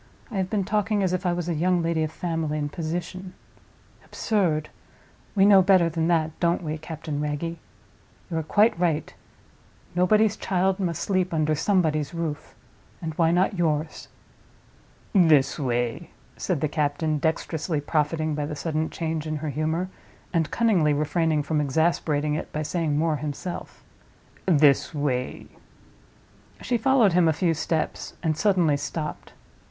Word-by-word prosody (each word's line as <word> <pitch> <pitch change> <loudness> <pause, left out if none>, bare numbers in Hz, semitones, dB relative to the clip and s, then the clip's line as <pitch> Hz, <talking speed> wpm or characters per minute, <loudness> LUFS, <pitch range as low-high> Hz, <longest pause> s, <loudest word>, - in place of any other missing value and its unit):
I 210 - -4
have 190 -1 -1
been 205 -1 0
talking 210 +1 0
as 185 -1 +1
if 185 0 -1
I 175 - +2
was 175 -1 -3
a 175 - 0
young 175 +2 +1
lady 165 -1 0
of 155 -1 -1
family 165 -3 -2
and 145 -1 -3
position. 175 +3 -5 0.7
Absurd! 170 -9 0 0.7
We 195 -1 +5
know 200 -2 +7
better 185 -2 +4
than 165 0 -1
that, 160 -2 +2
don't 170 +1 +1
we, 155 0 -3
Captain 155 -2 -5
Wragge? 150 +3 -3 0.7
You 165 - -1
are - - +1
quite 205 +4 +3
right. 160 -4 0 0.8
Nobody's 210 +4 +3
child 190 0 0
must 170 -5 -2
sleep 185 -2 0
under 155 -1 +1
Somebody's 155 -3 +1
roof—and 160 0 -7
why 165 +1 +2
not 180 +2 +1
yours?" 155 -2 -1 1.1
"This 160 -10 +4
way," 120 +3 -1 0.3
said 175 -7 -2
the 155 - +2
captain, 150 +1 -1
dexterously 160 0 -1
profiting 155 +1 0
by 150 -1 -2
the 150 - -5
sudden 155 +1 -2
change 160 -1 -3
in 155 - -2
her 150 +1 -3
humor, 160 +5 -1 0.5
and 165 -3 +1
cunningly 190 -11 +2
refraining 155 +1 +1
from 150 +1 0
exasperating 150 0 +1
it 150 - -4
by 155 - -2
saying 155 -2 -1
more 155 0 +1
himself. 150 +4 -6 0.6
"This 150 -2 +4
way." 130 -3 -2 1.1
She 240 -2 -1
followed 235 -5 +4
him 175 -1 +4
a 160 - +3
few 170 +1 +1
steps, 160 0 -2
and 160 -2 +1
suddenly 175 -5 +2
stopped. 150 +1 -5
160 Hz, 150 wpm, -25 LUFS, 150-180 Hz, 1.1 s, know